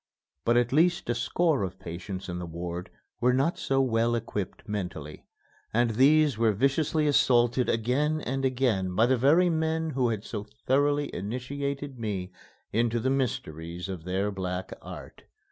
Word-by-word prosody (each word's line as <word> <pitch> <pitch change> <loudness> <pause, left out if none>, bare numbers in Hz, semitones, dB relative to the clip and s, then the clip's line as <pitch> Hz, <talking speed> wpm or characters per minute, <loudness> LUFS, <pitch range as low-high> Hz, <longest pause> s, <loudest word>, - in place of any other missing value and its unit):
But 120 +1 +4
at 120 +1 +2
least 175 +4 +3
a - - +2
score 165 -5 +1
of 95 -1 -3
patients 90 +3 -6
in 90 -1 -4
the 90 - -5
ward 85 +1 -5 0.3
were 125 +1 +3
not 135 +7 +1
so 135 0 +1
well 120 -2 +2
equipped 110 -2 -4
mentally, 90 -8 -5 0.5
and 120 0 +3
these 140 +3 +4
were 115 -2 +3
viciously 140 +7 +1
assaulted 125 -3 +3
again 135 +7 +1
and 135 -2 -3
again 120 -9 +1
by 110 - +5
the 130 +2 +3
very 160 +8 +4
men 160 0 0
who 125 -3 +1
had 110 -3 -2
so 105 -3 -5 0.2
thoroughly 145 +2 +2
initiated 135 +5 -4
me 100 -5 -3 0.4
into 115 +1 +1
the 130 +4 0
mysteries 85 - -3
of 95 -4 -6
their 95 +3 -1
black 95 -1 -4
art. - - -10
120 Hz, 160 wpm, -28 LUFS, 95-140 Hz, 0.5 s, by